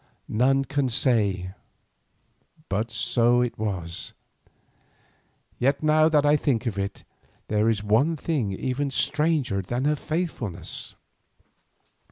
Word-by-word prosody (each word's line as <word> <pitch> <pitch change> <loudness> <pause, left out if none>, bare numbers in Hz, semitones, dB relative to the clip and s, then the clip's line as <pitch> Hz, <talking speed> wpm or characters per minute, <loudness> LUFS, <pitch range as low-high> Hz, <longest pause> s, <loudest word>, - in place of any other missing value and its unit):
None 135 +4 +3
can 140 -2 0
say, 100 -7 +1 1.2
but 105 +4 -1
so 120 +1 +2
it 125 -3 -2
was. 95 -6 -3 1.5
Yet 140 +4 +1
now 155 +1 +4
that 150 -2 +3
I 145 +1 +5
think 135 -5 0
of 105 -4 -2
it, 100 +1 -4 0.4
there 105 +1 +2
is 105 -2 0
one 115 +11 +2
thing 140 -10 -1
even 130 +8 -2
stranger 140 -4 0
than 120 +8 -3
her 150 +1 +3
faithfulness. 140 - -4
125 Hz, 115 wpm, -25 LUFS, 105-145 Hz, 1.5 s, I